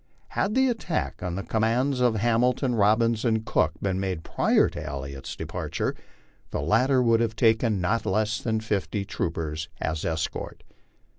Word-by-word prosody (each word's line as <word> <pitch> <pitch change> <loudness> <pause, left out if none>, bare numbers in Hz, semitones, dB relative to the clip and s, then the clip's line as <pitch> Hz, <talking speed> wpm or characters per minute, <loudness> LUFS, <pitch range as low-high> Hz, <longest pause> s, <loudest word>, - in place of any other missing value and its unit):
Had 205 +2 -1
the 265 0 +4
attack 220 -9 -2
on 90 -1 -3
the 100 - -3
commands 120 +5 +1
of 120 -3 +3
Hamilton, 120 +3 +2
Bobbins, 110 +2 +3
and 110 -2 +1
Cook 80 -5 +2
been 95 -1 0
made 95 -4 -2
prior - - +3
to - - -6
Elliott's 70 0 -6
departure, - - -3 0.6
the - - -3
latter 125 - +3
would 115 -1 +4
have 115 -1 0
taken 110 -2 +3
not 105 +6 0
less 110 +1 +1
than 110 -2 -1
fifty 105 -1 -2
troopers 80 -3 -3
as 80 0 -2
escort. 80 -1 -3
110 Hz, 155 wpm, -26 LUFS, 90-120 Hz, 0.6 s, the